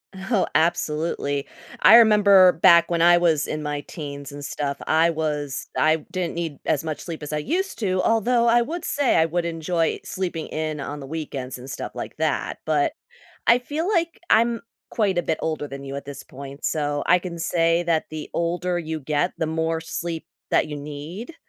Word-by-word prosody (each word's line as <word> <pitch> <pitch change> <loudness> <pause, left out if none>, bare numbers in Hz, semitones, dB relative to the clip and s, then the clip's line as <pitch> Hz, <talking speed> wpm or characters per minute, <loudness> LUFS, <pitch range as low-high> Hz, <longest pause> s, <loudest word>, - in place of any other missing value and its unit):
Oh, 190 +1 0
absolutely. 150 -3 0 0.3
I - - +9
remember 200 -5 +7
back 170 +1 +6
when 170 -1 0
I 175 +1 +7
was 165 -4 +2
in 155 - -4
my 150 -1 -3
teens 140 -3 -8
and 145 0 -8
stuff, 140 0 -3
I 165 +2 +4
was 150 -3 -3
I 155 +1 +4
didn't 180 -2 -2
need 165 -4 -4
as 150 -1 +1
much 155 -2 -4
sleep 165 -3 -7
as 150 - -6
I 150 - -1
used 355 - -2
to, 185 -4 0
although 235 +2 +2
I 235 +1 +5
would 335 +6 -5
say, 285 -5 +1
I 160 - +5
would 170 +1 -1
enjoy 165 0 -1
sleeping 175 -4 -4
in 155 -1 -3
on 145 +1 -5
the 140 - -8
weekends 135 -4 -5
and 130 +2 -10
stuff - - -5
like - - -7
that, - - -1
but 155 - +1 0.5
I 235 - +6
feel 300 +8 -3
like 340 -5 0
I'm 230 +1 +3 0.3
quite 200 -5 0
a 175 - +2
bit 160 -1 -1
older 155 -2 -2
than 140 -1 -8
you 135 0 -6
at 140 - -6
this 140 0 -8
point, 140 +1 -11
so 145 -2 -1
I 180 - +5
can 175 -1 -7
say 165 0 +2
that 165 -2 +1
the 155 -1 -6
older 175 +1 -1
you 160 -2 -4
get, 150 +5 0
the 160 - 0
more 160 +1 -1
sleep 165 0 -5 0.2
that - - +2
you 150 - -5
need, 150 - -7
165 Hz, 195 wpm, -23 LUFS, 150-185 Hz, 0.5 s, I